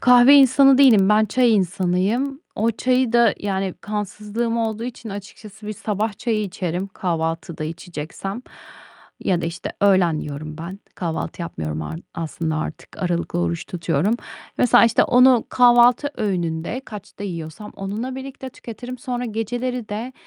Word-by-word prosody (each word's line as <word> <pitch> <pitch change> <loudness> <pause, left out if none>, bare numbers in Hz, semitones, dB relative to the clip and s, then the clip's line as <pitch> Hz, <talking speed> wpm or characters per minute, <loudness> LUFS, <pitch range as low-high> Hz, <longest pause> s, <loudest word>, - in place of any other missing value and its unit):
Kahve 250 +2 +7
insanı 270 0 +6
değilim. 225 -9 +6
Ben 210 +1 +5
çay 240 +3 +3
insanıyım. 195 - 0
O 225 +2 +1
çayı 250 +1 +1
da 235 -3 +5
yani, 195 -2 -2
kansızlığım 210 +3 -3
olduğu 225 -1 -2
için 240 -2 -7
açıkçası 205 +1 -10
bir 215 - -3
sabah 210 +1 -3
çayı 225 -3 0
içerim, 180 -2 -3
kahvaltıda 165 -3 -3
içeceksem 170 +6 -6 0.8
ya 180 -2 +1
da, 165 - -2
işte, 170 +1 -5
öğlen 185 -5 +4
yiyorum 150 +1 -6
ben. 175 +4 -7 0.2
Kahvaltı 170 0 -4
yapmıyorum 80 - -4
ar 80 +2 -6
aslında 160 -1 -3
artık. 155 0 -6
Aralıklı 175 - -1
oruç 85 -1 -1
tutuyorum. 170 +4 0 0.4
Mesela, 245 -2 +6
işte, 230 -1 +4
onu 250 -1 +5
kahvaltı 245 +3 +5
öğününde 175 +1 -2
kaçta 205 -2 -9
yiyorsam 170 +2 -7
onunla 210 +6 -4
birlikte 265 0 -7
tüketirim. 245 +2 -8
Sonra 245 0 -3
geceleri 240 +2 -3
de 225 +5 -5
210 Hz, 140 wpm, -22 LUFS, 175-240 Hz, 0.8 s, Kahve